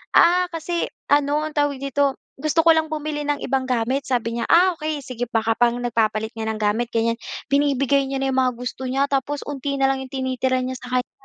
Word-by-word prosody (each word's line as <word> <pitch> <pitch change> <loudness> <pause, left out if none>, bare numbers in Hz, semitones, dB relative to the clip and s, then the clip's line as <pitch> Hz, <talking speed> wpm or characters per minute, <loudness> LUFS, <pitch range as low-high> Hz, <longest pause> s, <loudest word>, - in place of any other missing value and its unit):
"Ah 360 +1 +5
kasi, 335 +1 -2 0.2
ano 290 +1 +3
ang 310 - -10
tawag 290 -2 +1
dito, 275 0 0 0.2
gusto 310 +2 +2
ko 330 - +8
lang 320 0 +1
bumili 305 -1 -3
ng 290 -1 +1
ibang 265 -1 0
gamit." 250 +3 +1
sabi 235 -3 0
niya. 230 - -1
Ah, 365 +2 +6
okey 310 0 -2
sige 245 -2 -4
baka 225 -1 +1
parang 240 +1 +2
nagpapalit 220 -2 0
nga 225 -1 -4
ng 220 - -2
gamit 215 +3 0
ganyan. 230 0 +1 0.4
Binibigay 275 -1 +2
niya 270 - -2
na 270 0 0
'yong 260 - +2
mga 255 -1 +2
gusto 250 +1 -5
niya 270 +2 +2
tapos 280 +1 -1
'onti 280 0 -3
na 270 - +2
lang 265 0 -2
'yong 260 - -10
tinitira 260 -1 0
niya 255 +1 -3
sa 250 - -10
kanya. 250 - -2
270 Hz, 220 wpm, -22 LUFS, 245-290 Hz, 0.4 s, ko